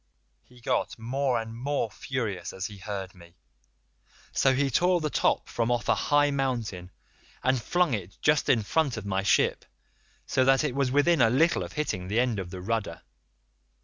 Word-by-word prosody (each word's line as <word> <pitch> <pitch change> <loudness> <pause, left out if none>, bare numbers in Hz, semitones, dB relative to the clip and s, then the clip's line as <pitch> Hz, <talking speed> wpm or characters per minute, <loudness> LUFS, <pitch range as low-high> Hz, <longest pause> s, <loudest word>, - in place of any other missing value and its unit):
"He 125 -1 -20
got - - -1
more 125 +2 -1
and 115 0 -7
more 130 -2 -2
furious 105 -8 -4
as 95 - -4
he 105 -2 -7
heard 95 -2 -5
me, 85 -2 -17 1.0
so 135 -1 +3
he 135 0 +1
tore 180 +7 +3
the 155 -2 -2
top - - +1
from 115 0 -1
off 120 -3 0
a - - +5
high 145 0 +2
mountain, 120 -10 -2 0.5
and 130 -1 +2
flung 175 +1 +1
it 100 -3 -5
just 150 -1 +2
in 115 -4 +3
front 140 +2 0
of 105 - -6
my 95 -1 0
ship 100 - +2 0.6
so 130 - +1
that 135 +2 +4
it 150 - -1
was 135 -1 +1
within 145 +3 +3
a 115 - +6
little 160 +8 +3
of - - -6
hitting 120 -12 -3
the 105 +5 0
end 120 -4 +1
of 90 -2 -5
the 90 0 -7
rudder. 100 -4 -3
120 Hz, 185 wpm, -27 LUFS, 100-140 Hz, 1.0 s, a